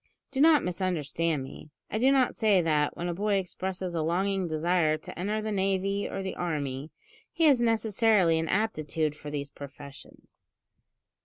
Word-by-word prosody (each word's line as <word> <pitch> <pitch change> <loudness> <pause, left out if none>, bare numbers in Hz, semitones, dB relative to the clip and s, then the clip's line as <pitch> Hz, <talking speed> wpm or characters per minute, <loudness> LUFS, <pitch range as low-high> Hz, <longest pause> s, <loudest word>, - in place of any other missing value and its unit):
Do 270 0 -1
not 310 -1 +6
misunderstand 165 -4 -1
me. 135 +3 -11 0.2
I 220 - -1
do 260 +3 +4
not 265 -2 +3
say 210 -4 +3
that, 150 -3 +1
when 175 - -3
a 175 - -1
boy 205 +3 0
expresses 185 -1 -3
a 165 - -1
longing 185 +3 0
desire 160 0 +1
to 155 - -10
enter 210 +4 -1
the 215 - -2
navy 195 0 0
or 195 - -4
the 190 - -3
army, 145 -4 -3 0.4
he 335 - -1
has 280 -6 +5
necessarily 220 -6 +3
an 160 - -2
aptitude 155 -7 -1
for 150 0 -9
these 140 -1 -4
professions. 140 0 -12
180 Hz, 165 wpm, -28 LUFS, 155-210 Hz, 0.4 s, not